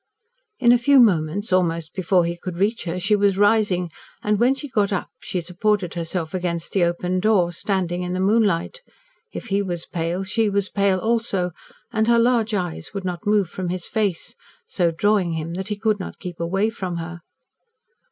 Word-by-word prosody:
In 240 -2 +5
a 245 - +5
few 275 +3 +5
moments, 190 -2 +2
almost 170 -3 +1
before 185 -1 +2
he 170 0 -2
could 175 0 -7
reach 210 +4 0
her, 175 +1 -3
she 200 +4 +2
was 200 -2 +2
rising, 205 -4 +2 0.3
and 210 -1 +1
when 250 +3 +4
she 275 +2 -7
got 210 -5 +1
up 190 - -2
she 180 - -3
supported 180 +2 -1
herself 165 -1 -3
against 170 -2 -3
the 190 - +3
open 180 +1 0
door, 190 -4 +3
standing 180 0 -2
in 180 0 -3
the 185 - -2
moonlight. 205 - +1 0.5
If 240 - -7
he 200 +1 +2
was 175 -4 -4
pale, 170 +2 -2
she 215 +3 0
was 200 0 0
pale 200 -2 +2
also, 220 -4 0 0.4
and 220 0 +1
her 235 0 +5
large 230 -2 +2
eyes 180 +1 -4
would 195 -1 -4
not 180 +1 -4
move 205 -3 +3
from 180 +1 -5
his 180 0 -3
face, 205 -6 -2 0.3
so 175 -3 +1
drawing 185 +1 +1
him 160 +1 -4
that 190 +2 -4
he 210 - -2
could 215 0 0
not 185 - -7
keep 180 -3 -8
away 195 +6 0
from 185 -6 -4
her. 170 +1 -6
190 Hz, 190 wpm, -22 LUFS, 175-210 Hz, 0.5 s, In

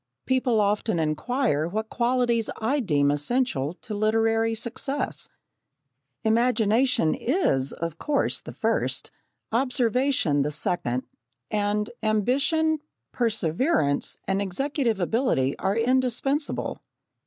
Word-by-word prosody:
People 255 -3 +2
often 210 0 +1
inquire 160 - 0
what 220 +5 -4
qualities 240 -2 +1
I 260 +7 +1
deem 145 - +2
essential 145 - 0
to 215 - -6
literary 225 +1 +2
success. 260 +5 -3 0.9
Imagination 230 -4 +3
is, 185 - +1
of 165 -1 -5
course, 290 -2 0
the - - -9
first, - - -1 0.4
observation, 250 - +2
the 145 - 0
second, 150 -5 -1 0.5
and 210 +1 0
ambition, 275 +9 +1 0.3
perseverance 215 - 0
and 195 +1 +1
executive 230 - -1
ability 180 - +1
are 195 +1 0
indispensable. 260 +4 0
225 Hz, 95 wpm, -25 LUFS, 180-255 Hz, 0.9 s, Imagination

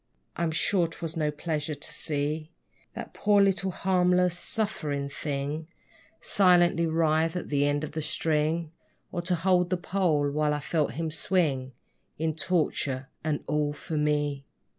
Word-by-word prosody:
I'm 170 0 0
sure 170 +2 +2
'twas 165 0 -6
no 155 -2 +1
pleasure 150 0 -3
to 145 - -7
see 150 +1 -2 0.5
That - - -7
poor 205 0 +3
little 195 -1 +3
harmless, 180 -1 +2
suffering 155 -9 -1
thing 145 +2 -3 0.5
Silently 175 -3 +4
writhe 160 +1 +2
at 180 - -4
the 145 0 +2
end 145 +1 0
of 155 - -4
the 155 - -3
string, 155 +1 0 0.4
Or 175 - -2
to 180 +1 0
hold 180 +1 +2
the 185 - +1
pole, 170 -6 +1
while 150 0 +1
I - - -2
felt 150 -3 0
him 160 +3 -3
swing 145 -7 0 0.4
In 160 0 0
torture, 145 -6 -1
and 155 -2 -1
all 150 -1 0
for 155 +2 -6
me! 145 -2 0
160 Hz, 150 wpm, -28 LUFS, 150-175 Hz, 0.5 s, Silently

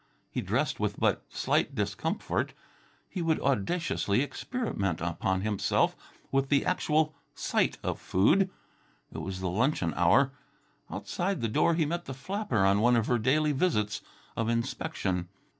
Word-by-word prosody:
He - - -2
dressed - - 0
with - - -1
but - - +2
slight - - 0
discomfort. - - -1 0.5
He 185 - -4
would 165 -1 +2
audaciously 130 - +1
experiment 145 - -2
upon 85 +2 -1
himself 105 -1 +1 0.4
with 135 0 +1
the 140 -1 +3
actual 155 -3 +2 0.2
sight - - +1
of - - -2
food. 185 - +3 0.6
It - - -6
was 95 -1 -5
the 95 - -1
luncheon 100 - +1
hour. 95 +11 +4 0.6
Outside 190 -1 -2
the 115 - +1
door 165 +9 +3
he 160 -2 +2
met 170 +3 -2
the 135 - -6
flapper 185 - 0
on 100 +1 +4
one 120 +3 +4
of 115 -2 +2
her 120 0 +2
daily 150 +6 +3
visits 130 - +1 0.3
of 115 0 0
inspection. 115 - -1
130 Hz, 145 wpm, -29 LUFS, 100-160 Hz, 0.6 s, hour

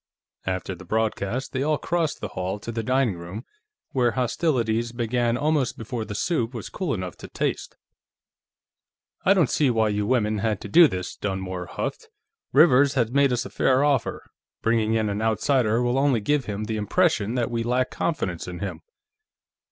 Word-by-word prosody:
After 95 0 -2
the 90 - -11
broadcast, 110 +4 -1
they 130 - -1
all 150 +1 +1
crossed 165 -2 -1
the 105 - -4
hall 95 +2 -3
to 115 - -5
the 115 0 -2
dining 125 -5 +1
room, 90 +8 -7 0.5
where 120 -3 +2
hostilities 120 -3 0
began 120 0 0
almost 145 -2 0
before 115 0 -4
the 105 - -6
soup 120 - -1
was 115 - -6
cool 180 - -2
enough 90 -2 -5
to - - -9
taste. - - -3 1.5
"I 195 - +6
don't 170 -9 +3
see 145 -3 +3
why 110 -2 +2
you 105 0 -1
women 110 -4 +1
had 105 -2 0
to - - -6
do 165 +10 +7
this," 90 -6 -5
Dunmore 95 -2 -4
huffed. - - -5 0.4
"Rivers 140 -1 +5
has 120 -3 +1
made 140 0 +3
us 120 -1 0
a - - -8
fair 130 +1 +3
offer. 145 -3 0 0.4
Bringing 115 -1 +2
in 110 -1 +1
an 105 +1 -2
outsider 115 +1 +2
will 120 +2 +1
only 135 -4 +3
give 140 +5 0
him 105 0 -4
the 110 0 -3
impression 115 - +1
that 120 -1 0
we 115 -1 -1
lack 125 +2 0
confidence 95 - -2
in 90 -1 -6
him." 100 +2 -5
115 Hz, 180 wpm, -25 LUFS, 105-135 Hz, 1.5 s, do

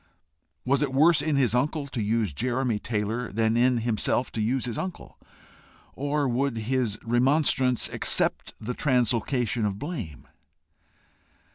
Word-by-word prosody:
Was 140 +2 +2
it 135 -3 -1
worse 160 +3 +5
in 155 -2 0
his 130 -5 +2
uncle 145 +4 0
to 135 -4 -4
use 110 -4 0
Jeremy 120 - -1
Taylor 110 +2 -2
than 110 +2 +1
in 125 +1 +3
himself 120 +2 0
to 110 - -3
use 125 +4 0
his 120 -3 -4
uncle? 185 -2 -6 0.7
Or 145 +1 -1
would 125 0 0
his 115 -1 -1
remonstrants 130 +1 +2
accept - - -1
the 120 +3 -4
translocation 125 -3 0
of 100 -2 -1
blame? 125 - -6
125 Hz, 135 wpm, -26 LUFS, 115-135 Hz, 0.7 s, worse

